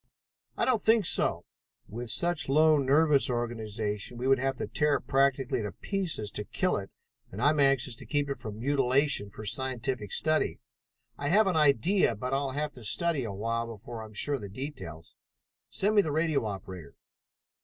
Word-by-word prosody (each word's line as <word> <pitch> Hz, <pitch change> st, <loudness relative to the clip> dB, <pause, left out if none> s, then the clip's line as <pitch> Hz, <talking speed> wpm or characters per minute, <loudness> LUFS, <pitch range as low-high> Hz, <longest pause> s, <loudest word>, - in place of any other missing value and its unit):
"I -, -, +2 dB
don't 240 Hz, -5 st, +2 dB
think 220 Hz, -1 st, +3 dB
so. -, -, +2 dB, 0.4 s
With 120 Hz, +2 st, -7 dB
such 170 Hz, +2 st, 0 dB
a -, -, -2 dB
low 155 Hz, +1 st, +5 dB
nervous 140 Hz, +1 st, +3 dB
organization, 110 Hz, -2 st, -3 dB
we 125 Hz, +2 st, -2 dB
would 135 Hz, -1 st, +4 dB
have 135 Hz, +1 st, -1 dB
to -, -, -4 dB
tear 150 Hz, -1 st, +1 dB
it -, -, -4 dB
practically 135 Hz, -2 st, +1 dB
to 105 Hz, -2 st, -5 dB
pieces 175 Hz, -, -3 dB
to 105 Hz, -, -1 dB
kill 185 Hz, -, -1 dB
it, 95 Hz, -1 st, -6 dB, 0.4 s
and 95 Hz, -, -8 dB
I 145 Hz, +5 st, +4 dB
am 155 Hz, -, -1 dB
anxious 135 Hz, -3 st, +3 dB
to -, -, -11 dB
keep 145 Hz, -1 st, 0 dB
it 140 Hz, -, -4 dB
from 110 Hz, -4 st, -7 dB
mutilation 135 Hz, -2 st, +1 dB
for 105 Hz, +2 st, -9 dB
scientific 125 Hz, -2 st, -1 dB
study. 155 Hz, 0 st, 0 dB, 0.6 s
I 145 Hz, -, -2 dB
have 210 Hz, +7 st, +4 dB
an 190 Hz, -3 st, 0 dB
idea, 150 Hz, -, +3 dB
but 125 Hz, +5 st, -4 dB
I'll 135 Hz, 0 st, 0 dB
have 150 Hz, +1 st, -2 dB
to 125 Hz, -, -13 dB
study 150 Hz, +4 st, +1 dB
a 110 Hz, -, -4 dB
while 115 Hz, +4 st, -2 dB
before 115 Hz, +1 st, -8 dB
I -, -, -7 dB
am 110 Hz, -, -13 dB
sure 145 Hz, -, +2 dB
of 140 Hz, -, -2 dB
the 100 Hz, -, -7 dB
details. 95 Hz, -, -8 dB, 0.5 s
Send 205 Hz, +3 st, 0 dB
me 210 Hz, -, +6 dB
the 155 Hz, -, -3 dB
radio 155 Hz, -4 st, 0 dB
operator." 95 Hz, -6 st, -7 dB
135 Hz, 195 wpm, -29 LUFS, 110-150 Hz, 0.6 s, me